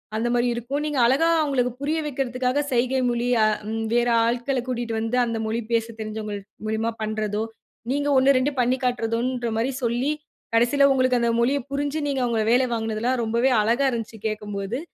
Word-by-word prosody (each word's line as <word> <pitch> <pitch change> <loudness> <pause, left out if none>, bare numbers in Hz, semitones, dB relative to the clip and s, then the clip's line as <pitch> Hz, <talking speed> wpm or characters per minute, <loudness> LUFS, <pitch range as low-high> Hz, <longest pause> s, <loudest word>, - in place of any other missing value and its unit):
அந்த 225 +2 0
மாரி 245 0 +2
இருக்கும். 250 +5 -3
நீங்க 295 -4 -1
அழகா 270 +7 +3
அவுங்களுக்கு 260 -5 +1
புரிய 305 +3 0
வைக்கிறதுக்காக 260 0 -1
சைகை 255 +2 +1
மொழி 240 0 -1 0.2
அ - - +5 0.3
ம் 225 0 -2
வேற 240 0 +3 0.2
ஆள்கள 245 +3 0
கூட்டிட்டு 240 -2 -3
வந்து 225 +2 -1
அந்த 230 -1 -2
மொழி 225 +2 -1
பேச 225 -1 +2
தெரிஞ்சவங்க 215 -1 -4 0.3
மூலியமா 220 +1 -1
பண்ணுறதோ! 215 0 -2 0.5
நீங்க 285 +1 0
1, 265 +1 +5
2 260 +3 +1
பண்ணிக்காட்டுறதுன்றமாரி 245 -1 0
சொல்லி, 240 +5 +1 0.4
கடைசில 265 +5 +4
உங்களுக்கு 255 -1 +2
அந்த 235 - +2
மொழிய 270 +4 +2
புரிஞ்சு, 285 +2 -1
நீங்க 270 -2 -1
அவுங்கள 230 -2 0
வேலை 255 +2 +4
வாங்கினதுல்லாம் 225 +2 -1
ரொம்பவே 235 +4 +2
அழகா 240 +6 +2
இருந்துச்சு 230 -2 -5
கேட்கும்போது. 210 +1 -4
240 Hz, 160 wpm, -24 LUFS, 225-260 Hz, 0.5 s, அ